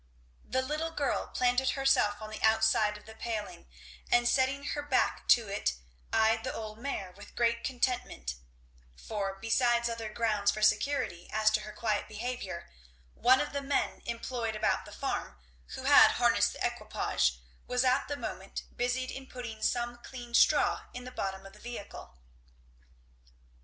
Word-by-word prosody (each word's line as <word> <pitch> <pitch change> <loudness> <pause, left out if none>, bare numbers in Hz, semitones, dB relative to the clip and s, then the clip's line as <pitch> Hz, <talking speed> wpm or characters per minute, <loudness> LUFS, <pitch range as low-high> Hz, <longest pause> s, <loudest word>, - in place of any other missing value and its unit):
The 260 - -1
little 305 +4 -2
girl 290 -4 -1
planted 250 +1 +2
herself 215 -6 +2
on 215 - -7
the 215 - -7
outside 220 -1 +3
of 210 - -17
the 220 - -11
paling 220 - -5 0.4
and 240 0 +4
setting 270 +2 +2
her 290 - -2
back 290 -3 0
to 230 -3 +5
it 195 - -1 0.4
eyed 225 0 +3
the - - -2
old 215 0 -7
mare 230 -8 -4
with 200 +3 -14
great 235 -1 +1
contentment; 250 - -1 0.6
for 195 - -4
besides 235 +2 +2
other 230 -2 -4
grounds 215 -3 +1
for 215 +1 -1
security 215 -4 +1
as 215 +1 +3
to 215 - +2
her 215 - -8
quiet 215 -2 -1
behaviour, 215 -5 -5 0.5
one 255 +2 +5
of - - -2
the 280 - -1
men 280 +1 -1
employed 230 -1 -3
about 215 0 +1
the - - -11
farm, - - -3 0.4
who - - -7
had - - +8
harnessed - - +3
the - - -2
equipage, 65 -1 0 0.3
was 250 +1 +1
at 255 +2 +3
the 285 - -3
moment - - -6
busied 250 +1 -1
in 270 0 -8
putting 240 -4 -7
some 240 +1 0
clean 240 -1 -10
straw - - +4
in 250 - -6
the 255 - -8
bottom 195 -4 -4
of 195 - -11
the - - -16
vehicle. 205 - -8
230 Hz, 165 wpm, -31 LUFS, 215-255 Hz, 0.6 s, had